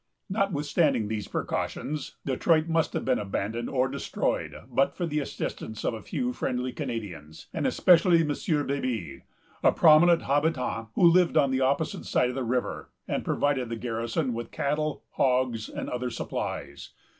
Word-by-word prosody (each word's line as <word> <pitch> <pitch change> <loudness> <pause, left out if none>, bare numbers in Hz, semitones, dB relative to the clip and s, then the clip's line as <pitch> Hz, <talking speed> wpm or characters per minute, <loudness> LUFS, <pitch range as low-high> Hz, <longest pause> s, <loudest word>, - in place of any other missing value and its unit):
Notwithstanding 150 - +1
these 105 -2 -3
precautions 150 -1 -3
Detroit 155 +4 +2
must 165 -1 +1
have - - -2
been 130 -1 +2
abandoned 105 +3 -3
or 130 -1 +1
destroyed, - - -2
but 135 - +1
for 175 - -2
the 150 -2 -1
assistance 110 -5 -5
of - - +1
a 110 - -6
few 250 - -2
friendly 125 - -2
Canadians, 105 - -6
and - - 0
especially 175 -1 +5
of - - -2
M. 145 0 0
Baby, 120 - -3 0.4
a - - +5
prominent 165 +2 +6
habitant, 140 -5 0
who - - +2
lived 170 -1 +5
on 140 -3 +4
the 130 0 +1
opposite 140 +4 0
side 125 - +2
of 125 - -5
the 135 - -2
river, 125 +1 -2 0.2
and - - -1
provided 135 -4 0
the 115 - -2
garrison 115 +4 -2
with 115 0 -5
cattle, 150 +1 -2
hogs, 125 -4 +1
and - - -5
other 125 0 -2
supplies. - - -5
135 Hz, 160 wpm, -27 LUFS, 120-155 Hz, 0.4 s, prominent